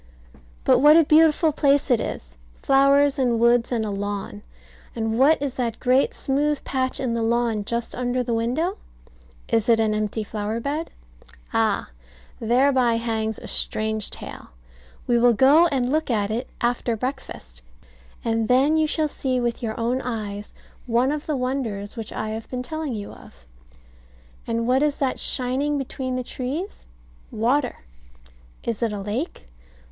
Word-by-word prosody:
But - - +4
what 300 +4 +7
a 330 - +7
beautiful 315 +1 +4
place 285 -1 +2
it 240 - +4
is! - - -6 0.3
Flowers 275 +1 +4
and 240 -3 +2
woods 235 +1 +3
and 225 -3 0
a 210 - -3
lawn; 200 - -4 0.5
and 225 0 -1
what 295 +4 +5
is 280 -2 -3
that 235 -4 -3
great 255 +2 +2
smooth 290 +1 0
patch 260 0 -1
in 255 -3 -1
the 230 - -1
lawn 230 -2 +1
just 235 +3 -3
under 250 0 -1
the 235 - -2
window? 255 - -1 0.7
Is 230 0 +1
it 230 -1 +5
an 220 -1 +2
empty 215 +1 -2
flower 210 +1 -3
bed? 295 +6 -3 0.6
Ah, - - +1 0.5
thereby 245 +1 +3
hangs 220 -2 -2
a - - -10
strange 220 -1 0
tale. - - -9 0.6
We 240 -1 +2
will 240 0 +5
go 285 +9 +6
and 260 -5 0
look 310 0 0
at 210 -3 0
it 240 +4 -3
after 240 -1 0
breakfast, 215 - -6 0.6
and 225 -1 0
then 270 +6 +4
you 315 0 +2
shall 310 0 +1
see 260 -3 -2
with 240 -1 -2
your 220 -2 -4
own 245 +3 0
eyes 210 -4 -5 0.4
one 245 +3 +2
of 300 0 -4
the 300 -3 0
wonders 245 -6 -3
which 225 -3 -6
I 215 - -4
have 220 +1 -6
been 250 -1 -4
telling 310 -1 -4
you 205 -1 -6
of. - - -16 1.0
And 230 0 -1
what 255 +2 +3
is 295 -1 +2
that 265 -2 -1
shining 265 +4 0
between 260 -1 -4
the 255 - -2
trees? 275 +11 -5 0.4
Water. 250 +4 0 0.8
Is 230 -2 -3
it 230 -2 0
a 205 - -4
lake? 210 - -4
245 Hz, 160 wpm, -23 LUFS, 225-275 Hz, 1.0 s, what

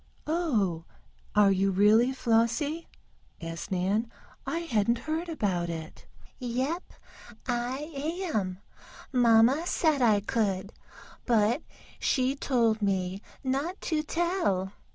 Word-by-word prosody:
"Oh, 225 - 0 0.5
are 205 -1 +6
you 195 +1 +2
really, 210 +6 +4
Flossie?" 250 +6 +1 0.5
asked 165 +3 -6
Nan. 195 +5 0 0.4
"I 335 - -1
hadn't 235 -7 +1
heard 320 +6 -3
about 190 - -1
it." 160 -1 -7 0.3
"Yep 260 +7 -1 0.7
I 255 +5 -2 0.4
am. 185 -3 -1 0.6
Mamma 245 +6 +5
said 310 -7 +2
I 215 -4 +4
could, 200 -2 -1 0.5
but 230 +3 +3 0.4
she 260 +1 +1
told 230 -6 +1
me 190 -1 -1 0.2
not 275 +8 -1
to 315 -3 0
tell. 325 - 0
230 Hz, 105 wpm, -28 LUFS, 195-285 Hz, 0.7 s, are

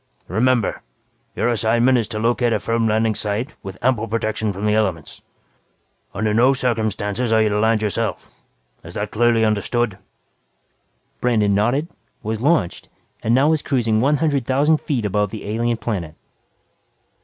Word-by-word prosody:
"Remember, 115 +3 +1 0.5
your - - 0
assignment 120 +2 +2
is 115 -4 +1
to 110 -2 -5
locate 120 +1 +1
a 110 - +1
firm 115 +3 0
landing 110 0 +2
site 105 +6 -2
with 95 -1 -8
ample 120 -3 +1
protection 110 -1 -1
from 100 +2 -5
the 105 - +2
elements. 95 -8 -1 0.9
Under 110 -1 0
no 125 +5 +4
circumstances 110 -2 -1
are 110 -1 +4
you 110 - +2
to 105 0 0
land 110 0 +2
yourself. 105 -3 -2 0.5
Is 85 - -11
that 105 +1 -3
clearly 115 0 +3
understood?" 110 0 0 1.2
Brandon 110 -5 +2
nodded, 120 +10 +1 0.4
was 110 +1 -3
launched 145 - 0 0.3
and 115 +2 +2
now 140 +4 +4
was 160 -2 +2
cruising 115 -6 +1
one 145 +4 +3
hundred 145 -3 0
thousand 145 +4 +2
feet 125 -7 -2
above 105 0 0
the 110 0 -8
alien 115 +2 0
planet. 90 -10 -4
110 Hz, 155 wpm, -20 LUFS, 105-120 Hz, 1.2 s, no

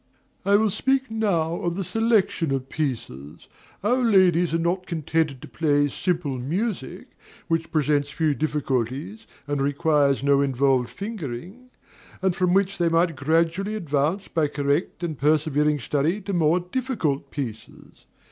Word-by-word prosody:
I 200 +1 +4
will 215 0 +3
speak 270 +3 0
now 175 -7 0
of 175 -1 -2
the 195 - -2
selection 200 -6 +1
of 135 -1 -2
pieces. 85 - -5 0.4
Our 240 +5 +2
ladies 180 -6 +4
are 165 - +1
not 175 +2 -1
contented 160 -4 -1
to - - -8
play 145 -2 +1
simple 160 -4 -2
music, 175 - -3 0.4
which 165 0 -1
presents 145 -2 +1
few 155 +1 0
difficulties 145 - -2 0.2
and 145 -1 -2
requires 145 -1 +2
no 140 0 +4
involved 135 -2 +2
fingering; 200 - -7 0.5
and 190 -2 +1
from 180 -1 +2
which 195 0 +1
they 170 -1 +3
might 165 0 +2
gradually 165 +8 0
advance 160 +1 -1
by 160 -3 +1
correct 145 +5 -1
and 160 -5 -3
persevering 150 0 +2
study 150 - 0
to 200 +1 -4
more 170 0 +3
difficult 180 - -2
pieces. 120 -7 -8
160 Hz, 140 wpm, -24 LUFS, 140-185 Hz, 0.5 s, I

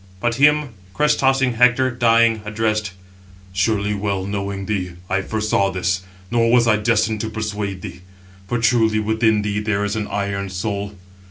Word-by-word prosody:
But 120 +4 0
him 150 +2 +3 0.3
crest 150 0 +2
tossing 135 -2 +2
Hector, 125 +2 +3
dying, 115 -2 +3
addressed: 110 -1 -1 0.6
"Surely 100 +1 0
well 100 -2 -2
knowing 100 -1 -4
thee, 95 -4 -3 0.2
I 95 0 +2
foresaw 105 -1 0
this, 90 0 -1 0.3
nor 115 -1 +2
was 120 -1 +5
I 110 -1 +4
destined 110 -1 +1
to 110 - -3
persuade 105 -3 -4
thee; 90 - -8 0.5
for 120 - -1
truly 115 -1 +2
within 110 0 +1
thee 105 0 -1
there 105 -1 -1
is 105 +1 -2
an 110 -1 -3
iron 100 -1 -3
soul. 100 +2 -4
110 Hz, 160 wpm, -20 LUFS, 100-115 Hz, 0.6 s, was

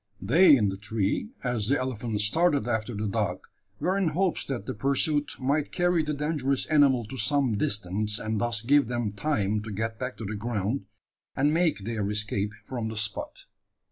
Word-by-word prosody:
They 150 - +6
in 105 -4 +2
the 95 - -4
tree, 105 - -1
as 120 -5 -1
the 140 +4 +3
elephant 120 -4 -3
started 145 +2 +2
after 110 0 -1
the 105 +1 -2
dog, 100 - -2 0.3
were 185 +2 +1
in 195 -3 +1
hopes 175 +3 +1
that 125 -7 -4
the - - -3
pursuit 140 +5 0
might 140 +3 0
carry 175 -1 +2
the 150 -1 -2
dangerous 145 -2 0
animal 140 -6 +4
to 130 +5 -8
some 130 0 +1
distance, 105 +1 0
and 110 -2 -2
thus 115 -2 0
give 140 +1 +4
them 120 -3 -2
time 105 -4 0
to 110 0 -7
get 110 +2 -3
back 125 0 -4
to 110 - -6
the 105 - -4
ground, 105 0 -2 0.5
and 145 +2 +2
make 160 - +1
their 105 -3 -2
escape 105 -1 -1
from 120 -3 -3
the 110 - -6
spot. 105 -1 -3
120 Hz, 185 wpm, -27 LUFS, 105-145 Hz, 0.5 s, They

